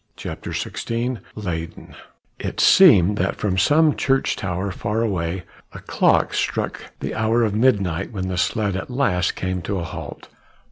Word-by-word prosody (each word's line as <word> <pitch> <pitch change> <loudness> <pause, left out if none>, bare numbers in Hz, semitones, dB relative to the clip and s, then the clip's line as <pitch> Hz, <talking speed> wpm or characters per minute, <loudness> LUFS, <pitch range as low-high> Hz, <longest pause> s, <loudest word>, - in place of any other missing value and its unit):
CHAPTER - - -7
XVI 120 +1 -3 0.2
LEYDEN 85 -5 -6 0.5
It - - -5
seemed 105 - +6
that 95 +2 0
from 95 -3 -1
some 150 +4 +4
church 135 -1 +1
tower 95 0 -3
far 105 +4 -2
away 90 -4 -2 0.3
a - - -8
clock - - +2
struck - - -2 0.2
the - - -3
hour 115 +2 +1
of 105 -3 0
midnight 105 -8 +1
when 95 -4 -4
the 95 - -3
sledge 100 -1 0
at 95 - -5
last 105 -9 0
came 95 -1 -3
to 100 +4 -3
a 90 - -3
halt. 80 - -8
100 Hz, 155 wpm, -22 LUFS, 90-115 Hz, 0.5 s, seemed